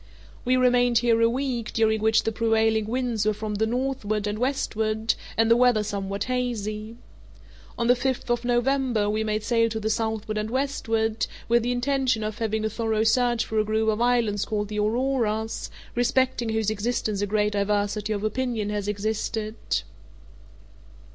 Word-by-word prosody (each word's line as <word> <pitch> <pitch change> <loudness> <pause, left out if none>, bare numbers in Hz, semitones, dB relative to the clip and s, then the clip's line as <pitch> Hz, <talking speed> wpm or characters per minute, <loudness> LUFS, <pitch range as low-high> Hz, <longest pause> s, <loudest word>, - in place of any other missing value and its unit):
We 255 +1 +2
remained 245 -1 +3
here 230 -1 +3
a 230 - +5
week, 250 -2 -2
during 220 -1 +2
which 220 0 +3
the 225 - 0
prevailing 220 -1 +1
winds 240 -2 -1
were 215 0 +1
from 215 0 -4
the 220 +2 0
northward 235 -4 -1
and 210 +1 -2
westward, 220 -4 0 0.2
and 225 0 +3
the - - +8
weather 245 -3 +4
somewhat 200 -1 -3
hazy. 225 -3 -3 0.8
On 235 - 0
the 245 +1 +5
fifth 255 -1 -2
of 240 0 0
November 245 -3 +1
we 215 +1 0
made 215 0 -1
sail 230 -1 +2
to 220 0 -3
the 220 0 -1
southward 220 -1 -2
and 215 +1 -3
westward, 225 -4 -1 0.2
with 235 +1 +4
the 240 +2 -1
intention 250 -2 0
of 215 0 -4
having 220 -1 -1
a - - +2
thorough 220 -1 0
search 240 +1 +2
for 220 - -1
a - - +3
group 220 +1 0
of 215 +1 0
islands 235 -4 +2
called 210 -1 -2
the 210 0 -3
Auroras, 220 -1 0 0.2
respecting 245 0 +1
whose 220 -1 0
existence 215 -1 -1
a 205 - 0
great 210 0 +1
diversity 205 +1 0
of 205 -1 -2
opinion 220 -2 -1
has 205 -1 -3
existed. 215 +1 -2
220 Hz, 170 wpm, -25 LUFS, 215-245 Hz, 0.8 s, the